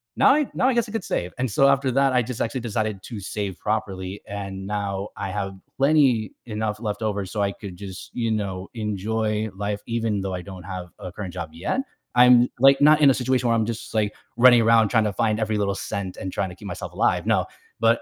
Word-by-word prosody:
Now - - +6
I 300 -3 +1
now 255 - +2
I 265 - +3
guess 235 -1 +1
I - - -8
could 225 -5 -3
save," 90 +1 -2
and 130 -2 0
so 135 +7 +4
after 140 -1 +3
that, 135 0 +3
I 125 - +4
just 120 0 -5
actually 115 +2 -1
decided 110 -3 -2
to 115 -4 -7
save 100 -1 -4
properly 100 -3 -3
and 100 -1 -6
now 100 -1 -2
I 95 - -3
have 95 -1 -3 0.2
plenty 135 -7 +3
enough 110 -1 -3
left 105 -1 -3
over 100 -3 -1
so 100 +2 -3
I 100 0 0
could 95 -4 -9
just, 95 -1 -9
you 115 -2 -1
know, 95 -3 -3
enjoy 110 +1 -1
life 105 +1 -3
even 115 -3 -1
though 95 -1 -3
I 90 - -5
don't 95 -2 -9
have 90 -2 -6
a 90 - -7
current 95 -3 -7
job 90 -2 -5
yet. 90 - -1 0.3
I'm, 125 0 +7
like, 135 +1 +6
not 150 +1 +6
in 140 - +8
a - - +3
situation 125 -1 0
where 115 - +3
I'm 110 -1 +1
just, 115 -1 -5
like, 105 -1 +1 0.2
running 120 -1 +7
around 115 -2 +5
trying 110 -3 +3
to 105 - -1
find 110 0 +1
every 110 -1 0
little 100 -1 0
cent 100 -4 -4
and 95 0 -5
trying 95 - -1
to 90 - -10
keep - - -10
myself - - -6
alive, - - +1
no. - - +3 0.3
But 115 0 +3
110 Hz, 235 wpm, -24 LUFS, 100-120 Hz, 0.3 s, in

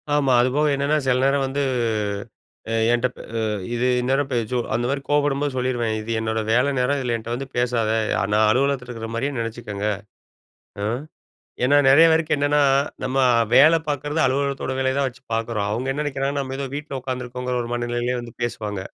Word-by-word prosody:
ஆமா. 135 -3 +3
அதுபோக 140 +5 +2
என்னன்னா, 140 +2 +1
சில 125 -1 +3
நேரம் 135 0 +2
வந்து 140 +2 -2 1.1
அ - - 0 0.2
என்ட்டப் 120 +1 0 0.2
அ - - 0 0.3
இது 120 +1 +1
இந்நேரம் 135 +2 0
பே 125 - 0
சோ 125 - +1 0.2
அந்த 120 +2 -1
மாரி 140 0 -1
கோவப்படும்போது 145 -1 +1
சொல்லிருவேன். 120 -3 -1
இது 115 - -5
என்னோட 110 0 -1
வேலை 125 +4 +3
நேரம். 140 +3 +1
இதில 120 -3 -1
என்ட்ட 115 +1 -9
வந்து 135 +2 -5
பேசாத. 120 -3 +1 0.4
நான் 110 0 +4
அலுவலகத்தில 130 +1 +1
இருக்கிற 115 -2 -6
மாரியே 140 +3 -2
நெனைச்சிக்கங்க. 110 -3 -4 1.0
ஆ - - -1 0.8
ஏன்னா, 145 +3 +4
நெறைய 160 +5 +7
பேருக்கு 160 -1 +2
என்னன்னா, 145 +1 +2 0.4
நம்ம 130 +1 -2 0.4
வேல 160 +3 +7
பார்க்குறது 145 +2 -1
அலுவலகத்தோட 135 0 -1
வேலையை 130 0 +1
தான் 140 - +2
வச்சு 125 0 -16
பார்க்குறோம். 115 -2 -1
அவங்க 130 +5 -1
என்ன 150 +2 -2
நெனைக்கிறாங்கன்னா, 140 0 -1
நம்ம 135 0 -5
ஏதோ 140 -1 -3
வீட்ல 145 -2 -5
உட்காந்துருக்கோங்குற 125 -1 -4
ஒரு 120 - -7
மனநிலையிலயே 120 +1 -1
வந்து 120 -1 -10
பேசுவாங்க. 105 -4 -3
130 Hz, 170 wpm, -22 LUFS, 120-140 Hz, 1.1 s, நெறைய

